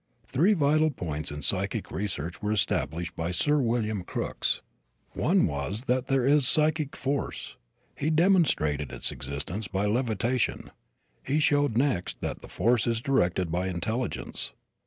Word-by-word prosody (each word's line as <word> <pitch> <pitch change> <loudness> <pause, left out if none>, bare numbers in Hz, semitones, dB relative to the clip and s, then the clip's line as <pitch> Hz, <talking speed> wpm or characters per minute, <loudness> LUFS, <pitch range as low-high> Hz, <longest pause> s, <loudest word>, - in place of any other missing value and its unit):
Three 175 +11 +3
vital 155 -2 +3
points 80 - -4
in 75 -1 -6
psychic - - -1
research 90 -4 -3
were 105 0 -1
established 85 -4 0
by 85 0 -2
Sir 145 - +2
William 115 -5 0
Crookes. - - -2 0.5
One - - +3
was 75 - -2
that 130 0 0
there 135 -2 +2
is 140 -1 +4
psychic 155 -1 +2
force. 135 +1 -3 0.4
He 150 - -1
demonstrated 155 - +3
its - - -2
existence 75 +10 -5
by 95 +4 -1
levitation. 115 +2 0 0.5
He 145 +3 +1
showed 145 -5 +2
next, 125 -9 0
that - - -3
the - - -11
force 115 +5 +2
is 115 -1 +1
directed 90 -9 +1
by 90 +2 0
intelligence. 110 +8 -3
115 Hz, 140 wpm, -28 LUFS, 85-140 Hz, 0.5 s, is